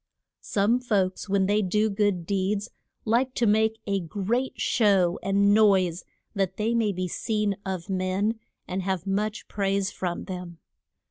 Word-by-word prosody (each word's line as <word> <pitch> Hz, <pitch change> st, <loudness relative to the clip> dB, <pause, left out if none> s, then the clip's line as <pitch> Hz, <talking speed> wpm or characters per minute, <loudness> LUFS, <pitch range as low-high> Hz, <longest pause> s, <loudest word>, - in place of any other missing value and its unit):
Some 215 Hz, +5 st, +1 dB
folks 200 Hz, -5 st, -1 dB
when 195 Hz, -1 st, +2 dB
they 205 Hz, +2 st, +2 dB
do 210 Hz, +3 st, +1 dB
good 200 Hz, -4 st, 0 dB
deeds 200 Hz, +3 st, -1 dB, 0.3 s
like 245 Hz, +4 st, +1 dB
to 240 Hz, -, +1 dB
make 220 Hz, +1 st, +2 dB
a 200 Hz, -1 st, 0 dB
great 205 Hz, +9 st, -2 dB
show 195 Hz, -6 st, +2 dB
and 200 Hz, +2 st, +3 dB
noise, 190 Hz, -5 st, +3 dB, 0.3 s
that 195 Hz, -3 st, -1 dB
they 220 Hz, +2 st, 0 dB
may 225 Hz, -3 st, +2 dB
be 185 Hz, -1 st, -3 dB
seen 210 Hz, +2 st, -1 dB
of 185 Hz, -2 st, -4 dB
men, 190 Hz, +3 st, -1 dB, 0.3 s
and 185 Hz, +1 st, -2 dB
have 190 Hz, -1 st, -2 dB
much 210 Hz, +2 st, -2 dB
praise 195 Hz, -1 st, -1 dB
from 175 Hz, -2 st, -3 dB
them. 180 Hz, -2 st, -7 dB
200 Hz, 150 wpm, -26 LUFS, 185-215 Hz, 0.3 s, and